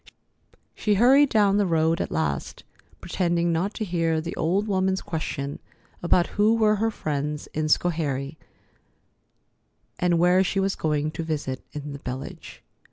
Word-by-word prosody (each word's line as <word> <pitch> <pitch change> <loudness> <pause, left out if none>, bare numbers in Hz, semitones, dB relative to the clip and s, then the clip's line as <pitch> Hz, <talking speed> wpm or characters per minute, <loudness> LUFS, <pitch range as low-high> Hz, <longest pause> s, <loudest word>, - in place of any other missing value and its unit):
She 210 -1 0
hurried 265 +6 +5
down 205 -3 +3
the 205 - +2
road 165 0 +1
at - - -3
last, 75 -3 -3 0.4
pretending 170 -1 0
not 185 +6 -1
to 220 - -3
hear 165 -3 0
the 165 +2 -5
old 190 +6 0
woman's 190 -1 +1
question 145 -3 -4 0.4
about 175 0 +3 0.2
who 220 +2 +5
were 215 -2 +3
her 225 +2 +1
friends 150 -6 -3
in 155 0 -1
Schoharie, 150 -3 0 1.6
and 175 -1 +2
where 180 +2 +4
she 195 +1 -1
was 195 0 +1
going 150 -1 -1
to 165 - -5
visit 150 -5 -3
in 145 -1 -6
the 140 - -8
village. 130 +1 -8
170 Hz, 150 wpm, -25 LUFS, 150-195 Hz, 1.6 s, hurried